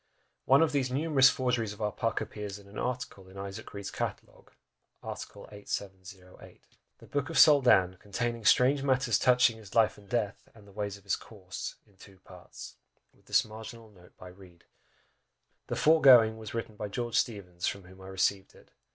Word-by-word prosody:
One 135 +5 +5
of 160 - +1
these 135 -3 0
numerous 135 0 +4
forgeries 125 -5 -1
of 105 - -15
our 105 -1 -1
Puck 115 +2 -2
appears 105 -2 -6
in 100 -1 -16
an 100 - -9
article 125 -7 -5
in 95 - -14
Isaac 100 +3 -7
Reed's 100 -1 -7
catalogue, - - -6 0.5
art. - - -6
8708. 95 -2 -9 0.3
"The - - -16
Boke 145 0 -3
of 165 - -6
the - - +4
Soldan, 120 - +6
conteyninge 115 +2 -3
strange 135 +3 +4
matters 130 -4 +1
touchynge 125 -2 +4
his 105 -3 -13
lyfe 110 -2 +3
and 100 -1 -19
deathe, 110 -4 -1 0.2
and 105 -2 -17
the - - -15
ways 100 0 -4
of 100 - -20
his 100 - 0
course, 95 -5 -8
in 100 -2 -28
two 95 0 -16
partes, 90 -1 -13 0.4
12mo," - - -29
with - - -30
this - - +3
marginal 110 +1 -11
note 90 -3 -20
by 90 - -11
Reed 90 -2 -17 1.0
"The - - -3
foregoing 125 -8 +6
was 110 0 -8
written 115 -2 -5
by 105 0 -5
George 120 +2 -4
Steevens, 90 -6 -4
Esq., - - +2
from 100 - -11
whom 95 +1 -16
I 95 - -11
received 95 0 -1
it. - - -20
105 Hz, 190 wpm, -29 LUFS, 95-125 Hz, 1.0 s, Soldan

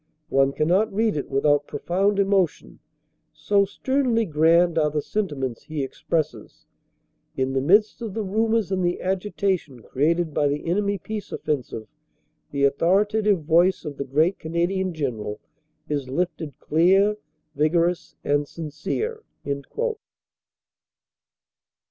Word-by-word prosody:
One 135 0 +3
cannot 180 +10 +2
read 215 0 +1
it 145 - -3
without 145 +1 +2
profound 195 +3 0
emo 195 -2 +4
tion, - - -18 0.5
so 200 -1 +2
sternly 245 +1 0
grand 165 +1 +3
are 150 -1 +2
the 150 0 -1
sentiments 140 - -3
he 155 -3 -3
expresses. 145 -3 -3 0.7
In 130 0 0
the 135 - +1
midst 205 - +3
of 220 -4 -5
the 220 - -1
rumors 220 +1 0
and 185 -1 0
the 175 0 0
agitation 185 - -2
created 160 +6 0
by 145 - +2
the 145 +1 -2
enemy 200 +4 0
peace 210 +3 -6
offensive 125 -7 -3 0.6
the 140 -1 -2
authoritative 195 +6 +2
voice 175 +4 +3
of 145 -2 -6
the - - -2
great 155 +8 +1
Canadian 175 +3 -1
General 120 -10 -4 0.5
is 145 -4 -3
lifted 160 -2 -3
clear, 195 +6 +3 0.4
vigorous 170 +4 +1
and 145 0 +1
sincere." 180 - -4
170 Hz, 125 wpm, -24 LUFS, 145-200 Hz, 0.7 s, emo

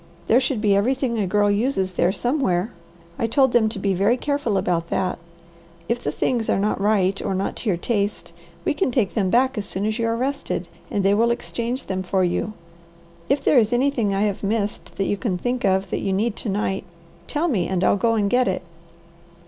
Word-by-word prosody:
There 235 - +5
should 260 -4 -1
be 205 -2 +3
everything 240 +2 +1
a 200 - 0
girl 205 +2 +2
uses 205 -3 0
there 175 +1 +2
somewhere. 235 - 0 0.5
I 230 - +1
told 265 +2 +3
them 225 -2 +4
to 215 - -6
be 195 0 0
very 200 +7 +2
careful 285 -7 -1
about 175 -3 0
that. 185 -2 -1 0.7
If 240 +1 -1
the - - -1
things 235 -3 -1
are - - +3
not 200 0 0
right 195 -2 +2
or 190 - -2
not 190 +1 -2
to 225 - -2
your 180 - +1
taste, 205 +1 -2 0.3
you - - +2
can 380 - 0
take 235 -6 0
them 195 -5 +1
back 255 +2 +2
as 200 - -3
soon 190 +2 -3
as 215 +2 -1
you 230 - +1
are 230 0 0
rested, 275 +3 -2 0.2
and 200 -1 -1
they 200 - +5
will 230 +3 +3
exchange 235 +1 -3
them 190 -1 -2
for 185 0 0
you. 180 +4 -1 0.8
If 275 +2 +1
there 270 - +5
is 220 0 +1
anything 245 -4 +1
I 195 0 0
have 205 -2 -1
missed 205 0 -2
that 195 - -1
you 205 - 0
can 195 -5 -1
think 245 +5 -2
of 190 -1 +1
that - - -1
you 195 - -1
need 215 +3 0
to 225 - -4
night, 195 -1 -1 0.4
tell 305 +3 0
me 205 - 0
and 190 -1 -1
I'll - - +4
go 230 +3 +1
and 205 -2 +1
get 250 +4 +2
it." 185 - -1
210 Hz, 220 wpm, -22 LUFS, 195-245 Hz, 0.8 s, There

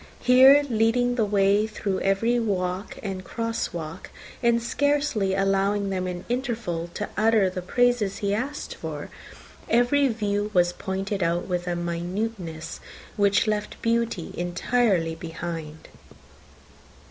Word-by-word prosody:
Here, 265 +3 +7
leading 240 +1 +2
the 230 -3 +1
way 200 +1 +3
through 200 -3 -3
every 225 +5 +2
walk 190 -3 -2
and 190 -2 -4
cross 230 +4 -3
walk, 165 -3 -7 0.3
and 235 -1 +3
scarcely 250 -5 0
allowing 195 +1 +1
them 185 -1 -2
an 180 0 -5
interval 235 -9 -2
to 210 - -3
utter 215 -3 +3
the 185 0 -4
praises 235 0 +1
he 200 -1 -1
asked 265 +7 -3
for, - - -7 0.6
every 245 +4 +4
view 210 -3 -1
was 175 0 +4
pointed 195 +1 -3
out 170 +1 0
with 180 -1 -2
a 175 - 0
minuteness 175 0 -4 0.4
which 200 -1 +3
left 210 -1 -2
beauty 230 -6 0
entirely 175 0 +1
behind. 165 -1 -7
200 Hz, 125 wpm, -25 LUFS, 180-230 Hz, 0.6 s, Here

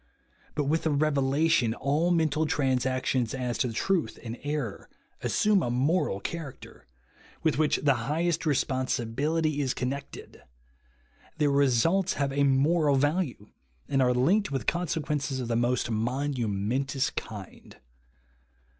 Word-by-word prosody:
But, 150 - +1
with 155 +4 0
a - - +2
revelation, 140 -3 +2
all 145 +7 +1
mental 160 -2 +2
transactions 130 -3 0
as 125 -2 -3
to 125 - 0
truth 175 - 0
and 115 -1 -5
error 145 -7 -4 0.3
assume 210 -2 +2
a 120 - -1
moral 130 - +1
character, 150 +4 -8 0.6
with 155 -2 +1
which 155 -1 +3
the 140 -2 +5 0.2
highest 165 +2 0
responsibility 140 +3 0
is 130 -3 -1
connected; 135 +3 -5 1.0
their 150 -2 +2
results 140 +8 +3
have 140 -1 -1
a 140 +1 +2
moral 145 +2 +3
value, 145 - 0 0.4
and 135 -1 +1
are 125 -1 +3
linked 190 +12 +2
with 135 -4 -2
consequences 150 -5 -1
of 120 -2 -4
the 115 - +1
most 120 0 0
momentous 125 +1 -1
kind. 105 -5 -8
140 Hz, 125 wpm, -28 LUFS, 125-155 Hz, 1.0 s, the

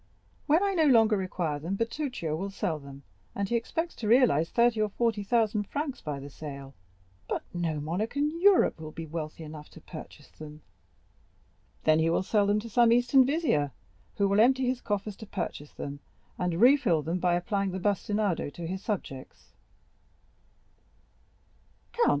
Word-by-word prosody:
"When 320 +6 +4
I 400 -1 +1
no 320 -4 +3
longer 225 -5 +5
require 180 -6 -2
them, 170 +6 -3
Bertuccio 230 - -2
will 195 +5 -3
sell 170 -5 -2
them, 140 0 -12 0.3
and 200 0 -1
he 235 - -1
expects 325 +9 -2
to 220 - -4
realize 220 - +4
thirty 235 -2 +3
or 215 - +1
forty 225 0 0
thousand 215 -1 +1
francs 290 -2 -4
by 145 -2 -4
the 140 +1 -9
sale." 140 -2 -8 0.6
"But - - -2
no 165 -3 -2
monarch 180 - -3
in 300 +4 -1
Europe 395 - +5
will 155 -1 -7
be 165 +1 -7
wealthy 160 0 -6
enough 150 -1 -10
to - - -14
purchase 150 -4 -11
them." 150 0 -11 1.2
"Then 155 0 +4
he 160 +1 +2
will 170 - +1
sell 205 +1 +2
them 205 +1 +2
to 230 - -8
some 235 +1 +4
Eastern 245 +2 +5
vizier, 245 - +1 0.4
who 200 - +2
will 200 +1 +2
empty 260 +3 +4
his 250 0 -1
coffers 205 -1 -3
to 220 - -10
purchase 170 -6 -5
them, 140 0 -6 0.4
and 175 -2 -2
refill 235 - +4
them 170 +4 -2
by 175 -1 +2
applying 195 +3 -1
the 185 - -4
bastinado 205 -2 0
to 170 +4 -8
his 185 +3 -4
subjects." 155 - -6
200 Hz, 170 wpm, -28 LUFS, 160-235 Hz, 1.2 s, longer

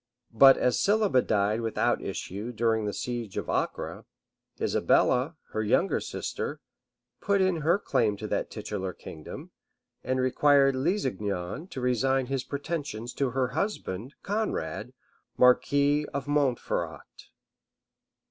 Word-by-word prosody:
[*] 125 -1 -47
But 135 +4 +7
as 125 - +1
Sibylla 205 -10 +3
died 105 +1 +1
without 115 -1 0
issue 105 +6 -5
during 115 -2 +1
the 105 - -1
siege 120 -4 -4
of - - -3
Acre, - - -2 0.5
Isabella, 130 +7 +2 0.2
her 110 - -1
younger 115 - +2
sister, - - -4 0.6
put 200 0 +2
in 185 -2 +2
her 165 +4 +2
claim 120 - 0
to - - -6
that - - -1
titular 95 -3 -4
kingdom, 80 -1 -10 0.5
and 130 +1 -1
required 135 +2 +4
Lusignan 125 - -2
to 130 - -7
resign 130 +2 +1
his 135 0 -2
pretensions 140 -6 -4
to 135 -2 0
her 130 0 0
husband, 130 - -3
Conrade, 200 - -2 0.4
marquis 145 +3 +4
of 140 0 -3
Montferrat. 145 -4 -2
130 Hz, 125 wpm, -28 LUFS, 110-145 Hz, 0.6 s, But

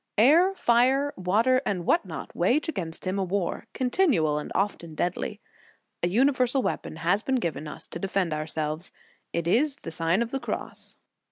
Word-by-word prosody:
Air, 330 - +5
fire, 265 +2 +3
water, 220 +8 +2
and 180 -7 -2
what - - +3
not, 160 -5 -7
wage 245 - +2
against 170 - -4
him 185 +2 -1
a - - +1
war, 185 -1 -2
continual 245 - +2
and 150 - -7
often 170 -5 -1
deadly. 175 +3 -2 0.6
A 175 - +2
universal 255 +4 +2
weapon - - -3
has 175 +6 +1
been 265 - 0
given 170 -9 -2
us 150 - -7
to 170 - -5
defend 190 -2 0
ourselves; 155 +2 -3 0.4
it 170 0 -2
is 275 - +3
the 165 - -8
Sign 165 +6 +1
of 235 - -7
the 270 - -1
Cross. - - -4
195 Hz, 170 wpm, -27 LUFS, 170-255 Hz, 0.6 s, Air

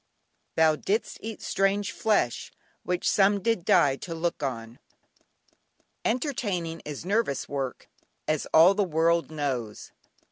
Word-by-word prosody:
"Thou 160 -1 +4
didst 210 +8 -2
eat 220 -1 -7
strange 195 +1 0
flesh 210 - 0 0.3
Which 180 0 -2
some 200 0 +4
did 225 -2 0
die 140 -5 +4
to 165 +2 -6
look 165 -1 -2
on." 115 -4 -5 1.2
Entertaining 205 - -2
is 150 +2 -6
nervous 200 - 0
work, 135 -3 -4 0.4
as 155 -1 -1
all 165 +4 +7
the 205 +1 +1
world 170 -1 +1
knows. 135 -8 -4
170 Hz, 120 wpm, -27 LUFS, 145-200 Hz, 1.2 s, all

